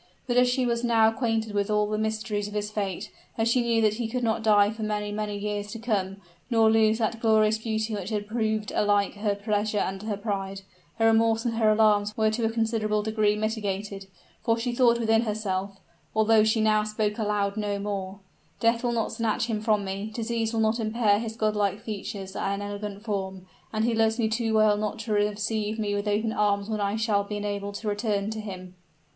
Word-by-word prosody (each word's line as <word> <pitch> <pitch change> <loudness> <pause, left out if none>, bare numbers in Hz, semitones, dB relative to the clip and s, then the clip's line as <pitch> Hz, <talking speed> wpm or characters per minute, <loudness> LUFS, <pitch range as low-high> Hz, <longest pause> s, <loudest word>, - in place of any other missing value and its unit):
But 245 - -1
as 250 0 +5
she 250 0 +1
was 235 0 0
now 225 -2 +4
acquainted 225 -3 -1
with 205 0 0
all 210 0 +2
the 210 +1 -2
mysteries 215 -1 -2
of 210 - -8
his 210 0 -2
fate, 200 -4 -3 0.3
as 225 0 +1
she 245 +2 +3
knew 230 -1 +2
that 215 -1 +4
he 230 - -1
could 250 +2 -3
not 225 -1 +1
die 210 -2 +4
for 220 0 -8
many, 210 -1 -2
many 210 0 -3
years 205 0 -3
to - - -5
come, 200 -4 -1 0.3
nor 225 -2 +4
lose 220 0 +4
that 225 0 -1
glorious 220 -1 +3
beauty 220 0 -2
which 200 -2 -4
had 210 -2 -2
proved 215 -1 -1
alike 205 -1 +2
her 205 0 -1
pleasure 210 +1 -1
and 190 -1 -1
her 210 -1 -3
pride, 195 -2 -3 0.4
her 225 - +2
remorse 225 0 +3
and 235 - 0
her 220 -2 +4
alarms 210 -1 +3
were 220 -1 +3
to 230 +2 -2
a 225 - +2
considerable 220 -2 0
degree 215 -1 +1
mitigated: 205 -2 -3 0.3
for 230 -2 +1
she 240 +1 -2
thought 235 -1 +4
within 225 -1 +3
herself, 200 -3 -2 0.4
although 220 0 +5
she 220 +1 +2
now 215 -1 +3
spoke 215 0 -2
aloud 205 -2 0
no 205 -2 -1
more; 200 -1 -4 0.4
"Death 230 +1 +2
will 240 -1 +1
not 225 -2 -1
snatch 225 -1 0
him 220 -2 -2
from 215 -2 +1
me, 195 +2 -4
disease 225 0 -2
will 225 -1 0
not 220 +2 +2
impair 215 -2 +2
his 225 -1 -5
godlike 210 -2 0
features 200 -2 -6
and 200 +1 -2
elegant 205 0 -6
form, 190 -4 -4 0.3
and 220 0 0
he 235 - +1
loves 225 0 +2
me 230 -3 +1
too 225 +1 -1
well 215 -1 +4
not 210 +1 -2
to 220 -1 -3
receive 210 +1 0
me 210 -2 -1
with 205 +1 -2
open 215 +2 0
arms 205 0 +1
when 215 -1 -1
I 200 +1 0
shall 220 -2 +1
be 205 +1 -5
enabled 205 -1 -4
to 215 - -5
return 205 -1 -1
to 220 - -5
him." 185 -3 -8
215 Hz, 210 wpm, -26 LUFS, 205-225 Hz, 0.4 s, as